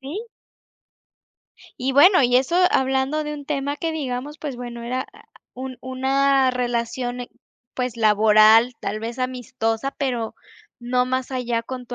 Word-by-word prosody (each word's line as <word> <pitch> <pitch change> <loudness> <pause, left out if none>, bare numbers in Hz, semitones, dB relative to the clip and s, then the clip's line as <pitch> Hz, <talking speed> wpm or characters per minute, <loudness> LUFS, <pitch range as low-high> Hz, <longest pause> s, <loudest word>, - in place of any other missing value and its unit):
Sí. 315 - -6 1.5
Y 260 +2 -1
bueno, 355 +4 +6
y 245 0 +4
eso 270 +7 +1 0.2
hablando 265 +3 +1
de 300 0 -4
un 290 -1 -9
tema 285 -1 -2
que 325 +2 -2
digamos, 290 -1 -4
pues, 290 -4 -5
bueno, 240 -1 -7
era 255 +2 -3
ah - - -18 0.3
un 255 0 -7
una 265 +1 +2
relación, 245 0 -2 0.5
pues, 250 -2 -3
laboral, 220 +2 +5
tal 215 +2 -3
vez 230 +3 -6
amistosa, 255 -1 -2
pero 245 -5 -2 0.4
no 250 +1 0
más 255 0 -2
allá 240 -2 -1
con 250 0 -7
tu 245 - -6
255 Hz, 145 wpm, -22 LUFS, 240-275 Hz, 1.5 s, bueno